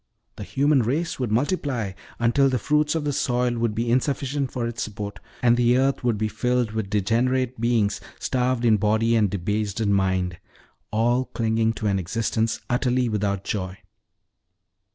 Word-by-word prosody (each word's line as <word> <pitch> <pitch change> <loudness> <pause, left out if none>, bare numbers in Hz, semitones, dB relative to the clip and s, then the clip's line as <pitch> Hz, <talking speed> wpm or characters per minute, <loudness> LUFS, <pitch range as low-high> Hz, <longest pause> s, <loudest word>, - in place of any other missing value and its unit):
The - - -6
human 140 0 +2
race 140 +9 -1
would 125 -4 -1
multiply, 125 - 0 0.3
until 130 +4 +3
the 130 - +1
fruits 150 +6 +1
of 160 - -1
the 145 -1 -1
soil 125 -1 +1
would 115 -2 0
be 115 +1 0
insufficient 135 +1 0
for 120 -2 -2
its 115 0 -4
support; 100 -1 -5 0.2
and 120 0 +4
earth 125 +3 +2
would 120 -3 +1
be 110 +1 0
filled 120 +2 0
with 110 -3 -3
degenerate 120 +4 0
beings, 110 -3 +1 0.2
starved 125 -1 0
in 110 -2 +5
body 110 +3 +2
and 105 -3 +3
debased 100 +2 -2
in 105 -3 +2
mind 95 -2 0 0.5
all 120 +4 +1
clinging 110 -1 0
to 115 - -6
an 100 -2 +2
existence 110 +4 -1
utterly 125 0 +1
without 100 -2 -1
joy. 95 -2 -3
115 Hz, 160 wpm, -24 LUFS, 105-125 Hz, 0.5 s, in